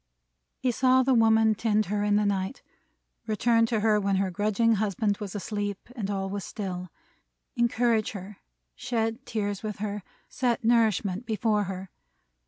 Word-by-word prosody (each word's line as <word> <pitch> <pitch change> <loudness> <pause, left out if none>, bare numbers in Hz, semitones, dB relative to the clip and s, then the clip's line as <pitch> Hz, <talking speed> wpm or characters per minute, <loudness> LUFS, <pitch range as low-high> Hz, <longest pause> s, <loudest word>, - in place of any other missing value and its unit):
He 255 - 0
saw 255 +2 +4
the 265 +1 +3
woman 220 -1 +5
tend 215 0 +1
her 205 +2 -1
in 205 0 +2
the 210 0 +2
night; 195 +4 -2 0.6
return 230 +1 +3
to 225 -2 0
her 215 -1 +3
when 200 -1 +1
her 190 0 0
grudging 215 +4 +2
husband 205 0 0
was 205 -3 -6
asleep, 205 0 -3 0.2
and 205 -5 -3
all 195 -1 -2
was 200 0 -4
still; 185 -4 -5 0.7
encourage 235 -2 +1
her, 200 0 -8 0.4
shed 225 -2 -2
tears 205 -3 -2
with 215 -2 -4
her, 210 0 -3 0.3
set 245 0 -1
nourishment 220 -3 +2
before 215 -2 +1
her. 190 0 -6
210 Hz, 155 wpm, -27 LUFS, 200-230 Hz, 0.7 s, woman